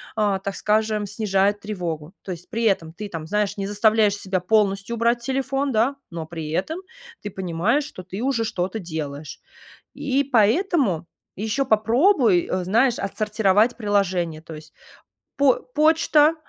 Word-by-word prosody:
а, 205 -3 +1
так 195 0 -5
скажем, 215 0 +1
снижает 205 0 0
тревогу, 175 -6 -5
то 190 - -6
есть 175 0 -8
при 230 0 -2
этом 190 -7 +1
ты 210 +4 -6
там, 165 -4 -6
знаешь, 210 +2 0
не 195 -1 -3
заставляешь 210 0 +3
себя 190 -2 -1
полностью 200 +2 +1
убрать 235 +1 +1
телефон, 270 +2 -1
да, 235 +4 +2
но 170 -2 -6
при 160 -1 -6
этом 310 - -2 0.4
ты 205 - -5
понимаешь, 190 - 0
что 285 -10 -9
ты 190 +3 -7
уже 255 -4 0
что-то 190 +1 -2
делаешь, 155 -4 -6 0.5
и 280 -1 0
поэтому 240 - +2 0.3
еще 220 +7 -1
попробуй, 230 - +3
э, 185 0 -1
знаешь, 230 +7 +2
отсортировать 210 +2 +1
приложения, 190 -7 0
то 160 -1 -10
есть 155 +1 -13 0.7
по 280 -3 +5
почта, 305 +2 +3
210 Hz, 150 wpm, -23 LUFS, 185-235 Hz, 0.7 s, по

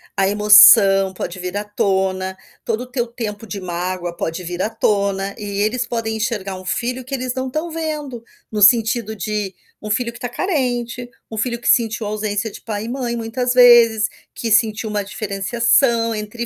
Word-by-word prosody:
a 195 0 +2
emoção 205 -2 +7
pode 180 0 -6
vir 180 +2 -4
à 205 - -2
tona, 190 -2 -1 0.3
todo 225 +2 -2
o 250 - -21
seu 240 -3 -1
tempo 225 -2 -6
de 200 - -5
mágoa 175 -1 -4
pode 165 +2 -4
vir 175 +1 -5
à 215 - 0
tona, 200 -3 -1
e - - -7 0.2
eles 235 +4 0
podem 225 -2 -3
enxergar 210 -4 -3
um 185 0 -10
filho 250 +6 -2
que 270 +2 -4
eles 255 -1 -3
não 260 +1 -3
estão 310 +6 -4
vendo, 300 -7 -5 0.3
no 210 - -2
sentido 220 +1 +4
de 210 -2 -3 0.3
um 210 - -7
filho 235 +2 -1
que 240 - -12
tá 245 - -4
carente, 245 -6 -2 0.2
um 220 - -6
filho 235 +1 -2
que - - -6
sentiu 225 -2 +2
ausência 210 0 -2
de - - -12
pai 210 -2 -4
e - - -6
mãe 245 -2 -3
muitas 245 +2 -2
vezes, 235 -3 +6 0.3
que 230 -2 -3
sentiu 220 0 +2
uma 205 -1 -1
diferenciação 230 +4 +1
entre 215 +3 -5
220 Hz, 185 wpm, -19 LUFS, 200-240 Hz, 0.3 s, emoção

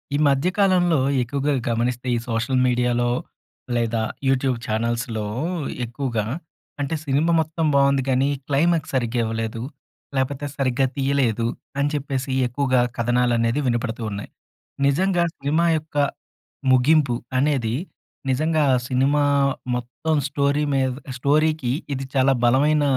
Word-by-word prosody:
ఈ - - +2
మధ్యకాలంలో 175 +3 +3 0.2
ఎక్కువగా 140 +4 -1 0.2
గమనిస్తే, 120 +2 -1
ఈ - - 0
సోషల్ 120 +3 0
మీడియాలో 120 -1 +1 0.7
లేదా 115 -1 0 0.3
యూట్యూబ్ 130 -1 +2
ఛానల్స్‌లో 115 0 -1 0.6
ఎక్కువగా 120 -3 -2 0.6
అంటే, 145 +3 -1
సినిమా 145 +4 +2
మొత్తం 160 +1 -1
బావుంది, 140 -1 +4
కానీ 130 +1 +2 0.2
క్లైమాక్స్ 160 +2 +1
సరిగ్గా 120 -1 0
ఇవ్వలేదు. 115 0 -3 0.5
లేకపోతే 135 +2 -1
సరిగ్గా 135 0 +1
తీయలేదు 135 -5 +1 0.3
అని 140 +1 +2
చెప్పేసి 140 -2 -2 0.2
ఎక్కువగా 130 0 +1 0.2
కథనాలనేది 120 +1 +1
వినపడుతూ 120 -1 -1
ఉన్నాయి. 100 0 -6 0.6
నిజంగా 175 +5 +2
సినిమా 150 +5 +1
యొక్క 155 -1 -8 0.7
ముగింపు 135 0 +4 0.2
అనేది, 130 -5 +1 0.5
నిజంగా 155 +4 +2 0.2
సినిమా 135 +3 +2 0.5
మొత్తం 125 +6 -2
స్టోరీ 140 +1 +1
మీద 135 -1 +2 0.3
స్టోరీకి 150 0 +1 0.2
ఇది 135 0 -5
చాలా 135 0 +4
బలమైన 145 +5 +3
135 Hz, 110 wpm, -22 LUFS, 120-145 Hz, 0.7 s, బావుంది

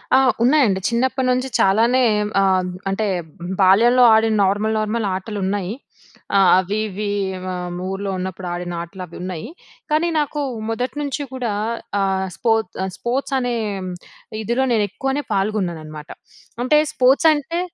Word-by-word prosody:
ఆ! - - +7 0.2
ఉన్నాయండి. 245 -7 +4
చిన్నప్పటి 260 +2 0
నుంచి 255 +1 0
చాలానే 230 +6 +4 0.4
ఆహ్, 185 -1 +2 0.2
అంటే 210 +2 -1 0.5
బాల్యంలో 230 +7 +5
ఆడిన 220 0 +3
నార్మల్, 210 +3 0
నార్మల్ 215 0 -1
ఆటలున్నాయి. 195 -1 -3 0.8
అవి 190 +3 0
ఇవి 205 +1 -4 0.4
ఆహ్, 180 -1 -4 0.2
ఊర్లో 195 +1 -3
ఉన్నప్పుడు 185 0 -5
ఆడిన 175 0 -4
ఆటలు 185 +2 -8
అవి 170 - -14
ఉన్నాయి. 180 0 -5 0.4
కానీ 310 +3 +2
నాకు 295 0 -2 0.3
మొదటి 245 +4 -2
నుంచి 285 0 -3
కూడా 245 -5 -2 0.5
ఆహ్, 190 -1 0
స్పో 230 -2 +2 0.3
ఆహ్, 190 - -3
స్పోర్ట్స్ 265 +3 -2
అనే 245 -1 -1 0.9
ఇదిలో, 235 +5 0
నేను 215 -2 +2
ఎక్కువనే 270 +7 -2
పాల్గొన్నాను 195 -4 -1
అనమాట. 155 0 -10 0.5
అంటే 300 +4 +4 0.2
స్పోర్ట్స్ 270 +2 +4
అంటే 300 +3 -3
215 Hz, 130 wpm, -20 LUFS, 190-255 Hz, 0.9 s, ఆ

